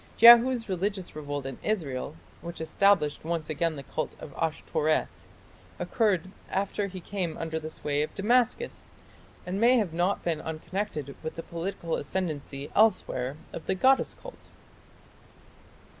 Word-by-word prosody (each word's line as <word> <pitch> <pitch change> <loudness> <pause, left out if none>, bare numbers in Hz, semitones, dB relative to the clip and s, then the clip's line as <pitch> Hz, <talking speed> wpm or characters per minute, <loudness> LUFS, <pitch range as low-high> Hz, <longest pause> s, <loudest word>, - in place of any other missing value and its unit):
Jehu's 235 +1 +8
religious 190 -1 -2
revolt 145 -2 -4
in 135 -2 -6
Israel, 150 -9 -2 0.3
which 170 +1 -7
established 160 -1 +2
once 160 -1 -2
again 160 +1 0
the 140 - -7
cult 155 +4 -4
of 145 - -9
Ashtoreth, 155 0 -1 0.5
occurred 190 -5 +1 0.2
after 200 +1 -1
he 190 -1 -7
came 180 -3 -3
under 160 -1 -3
the 155 0 -6
sway 145 -2 -1
of 150 - -3
Damascus, 245 - +1 0.6
and 190 +3 -2
may 245 +2 +6
have 200 -8 0
not 175 +4 +1
been 165 -3 -1
unconnected 160 -2 -4
with 160 - -5
the 165 - -5
political 170 -1 -3
ascendancy 145 -4 -4
elsewhere 155 - +2 0.2
of - - -7
the 190 - +1
goddess 265 +8 +3
cult. - - -12
170 Hz, 140 wpm, -28 LUFS, 155-200 Hz, 0.6 s, Jehu's